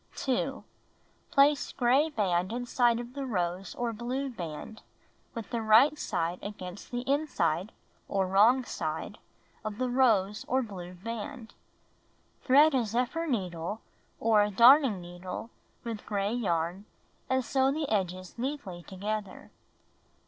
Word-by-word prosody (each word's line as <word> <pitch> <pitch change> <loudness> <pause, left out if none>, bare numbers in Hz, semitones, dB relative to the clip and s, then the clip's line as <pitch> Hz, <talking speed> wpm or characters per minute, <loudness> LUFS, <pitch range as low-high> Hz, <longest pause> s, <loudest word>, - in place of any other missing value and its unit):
2. 270 +1 -1 0.7
Place 280 +1 +3
gray 265 +5 +3
band 185 - 0
inside 240 0 +1
of 240 +1 -7
the 280 0 -4
rose 185 -6 -2
or 240 -1 -2
blue 255 +5 -3
band, 175 +1 -7 0.5
with 230 -2 -6
the 235 -2 -1
right 230 +8 +5
side 170 +2 -2
against 190 -2 -8
the 245 0 -3
inside 235 - 0 0.4
(or 195 -1 0
wrong 215 +8 +4
side) - - -4 0.4
of 215 -1 -5
the 255 0 -1
rose 215 -6 +2
or 260 +1 +1
blue 180 -5 -8
band. 230 +4 -7 0.9
Thread 290 +4 +6
a 255 -3 +2
zephyr 250 +9 -1
needle 185 - -3 0.4
or 220 -2 +4
a 205 - +2
darning 235 0 +6
needle 175 +5 -7 0.3
with 230 -3 -5
gray 205 0 -1
yarn, 180 -4 -1 0.4
and 260 -1 +1
sew 265 +1 +2
the 300 +1 -2
edges 185 -2 -2
neatly 245 -10 -4
together. 200 +2 -5
225 Hz, 130 wpm, -29 LUFS, 190-255 Hz, 0.9 s, Thread